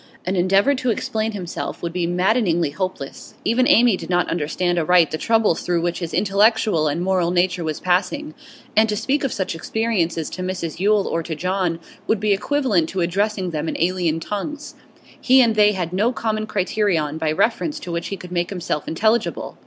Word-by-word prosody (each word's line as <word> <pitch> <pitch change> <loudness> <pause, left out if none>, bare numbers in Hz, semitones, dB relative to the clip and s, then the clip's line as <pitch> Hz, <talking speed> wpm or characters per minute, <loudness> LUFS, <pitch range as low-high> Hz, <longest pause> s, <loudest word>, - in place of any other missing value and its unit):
An 185 +2 -1
endeavour 195 +9 +3
to 255 -2 -2
explain 220 0 -1
himself 180 -4 -5
would 170 -1 -3
be 175 -1 -1
maddeningly 180 - +1
hopeless; 185 -5 -5
even 245 +3 +3
Amy 235 -3 +5
did - - -8
not 175 -1 +2
understand 175 +2 0
aright 170 0 +4
the 155 - -2
troubles 225 -6 +2
through 175 -1 0
which 175 0 -1
his 170 -2 -4
intellectual 205 -4 +2
and 160 +4 -1
moral 185 -2 +1
nature 180 0 +1
was 155 -2 -3
passing, 245 +12 0 0.4
and 220 +1 +4
to 210 - 0
speak 265 +7 0
of 270 - 0
such 190 -3 -2
experiences 170 -3 -1
to 185 - -6
Mrs 180 -4 -4
Yule 205 +1 +2
or 165 - -1
to 160 0 -5
John 180 0 -1 0.3
would 220 - +1
be 210 0 +2
equivalent 210 - +1
to 185 - -2
addressing 190 +1 -1
them 155 0 -2
in - - -4
alien 175 -2 0
tongues; 285 - -5 0.5
he 260 +1 +5
and 235 -3 +5
they 210 -1 +4
had 180 -3 -3
no 210 +6 +2
common 215 -3 -2
criterion 180 -7 0
by 160 -1 0
reference 245 - 0
to 175 - -6
which 170 0 -3
he 195 - -4
could 180 0 -11
make 175 -1 -1
himself 175 -6 -3
intelligible. 220 +7 0
185 Hz, 190 wpm, -21 LUFS, 170-215 Hz, 0.5 s, Amy